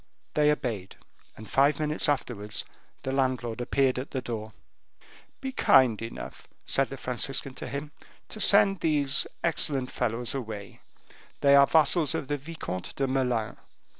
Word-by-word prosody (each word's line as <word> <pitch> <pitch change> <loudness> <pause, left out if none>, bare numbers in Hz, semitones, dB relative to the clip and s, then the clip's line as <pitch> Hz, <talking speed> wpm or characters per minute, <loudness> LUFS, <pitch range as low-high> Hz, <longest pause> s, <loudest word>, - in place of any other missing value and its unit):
They 150 0 +3
obeyed, 115 -10 -3 0.4
and 110 - -10
five 140 +6 +3
minutes 150 0 0
afterwards 105 -7 -2 0.4
the 130 - -2
landlord 130 -4 -1
appeared 130 +1 +1
at 130 - -6
the 130 - -3
door. 110 -3 -5 0.9
"Be 265 - -3
kind 130 - +4
enough," 115 0 -8 0.2
said 135 -1 +1
the 135 - -7
Franciscan 130 +2 -2
to - - -7
him, 140 +3 -5 0.4
"to 215 - -7
send 195 -1 +5
these 145 -4 +2 0.2
excellent 140 -6 +1
fellows 120 -1 -2
away; 110 -7 -7 0.6
they 140 0 +5
are 140 0 +7
vassals 160 0 +3
of 135 - -4
the 145 - 0
Vicomte 140 - -6
de 135 - 0
Melun. 125 -4 -1
135 Hz, 145 wpm, -27 LUFS, 120-145 Hz, 0.9 s, are